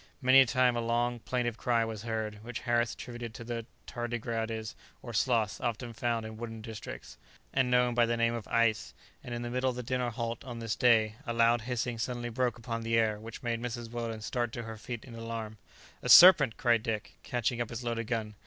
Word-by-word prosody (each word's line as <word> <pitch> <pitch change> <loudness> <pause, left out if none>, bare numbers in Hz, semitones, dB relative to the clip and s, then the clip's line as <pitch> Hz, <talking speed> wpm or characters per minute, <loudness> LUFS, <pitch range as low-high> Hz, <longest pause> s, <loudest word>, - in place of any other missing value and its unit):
Many 130 +1 +7
a - - +6
time 125 0 +3
a 120 - 0
long, 120 +1 0
plaintive 120 -1 -2
cry 115 -2 +2
was 110 -2 -5
heard, 110 -2 -4
which 120 0 -6
Harris 120 -2 +1
attributed 120 -2 -7
to 115 - -7
the 115 -1 -5 0.2
tardigrades 115 -2 -3 0.3
or 120 - -7
sloths 110 -2 +1
often 120 0 -3
found 115 -2 -1
in 110 0 -8
wooded 115 -1 -7
districts, 110 - -8 0.3
and 130 -2 +2
known 125 0 +3
by 120 -1 +3
the 120 0 0
name 115 0 +2
of 115 -3 -5
"ais;" 115 -2 +1 0.3
and 120 - -5
in 120 - -4
the 120 - -4
middle 130 +1 +1
of 125 - -3
the 125 - -5
dinner 125 0 -1
halt 115 -1 -4
on 125 -3 -7
this 115 -2 -2
day, 110 -3 +3
a 120 - -1
loud 115 0 +4
hissing 120 -1 -3
suddenly 120 0 -3
broke 125 +1 -1
upon 115 -1 -4
the 115 0 +1
air 110 -2 +2
which 115 +3 -9
made 115 -1 -1
Mrs. 120 -1 -5
Weldon 115 -2 -4
start 120 +1 -2
to 120 - -4
her 115 -1 -7
feet 110 +1 -7
in 125 - -11
alarm. 115 -2 -6 0.4
"A - - -4
serpent!" 155 -10 +9
cried 120 -3 +3
Dick, 110 -2 -4
catching 120 0 -1
up 120 - -2
his 115 +1 -6
loaded 115 -1 -2
gun. 110 -3 -2
115 Hz, 220 wpm, -30 LUFS, 115-120 Hz, 0.4 s, serpent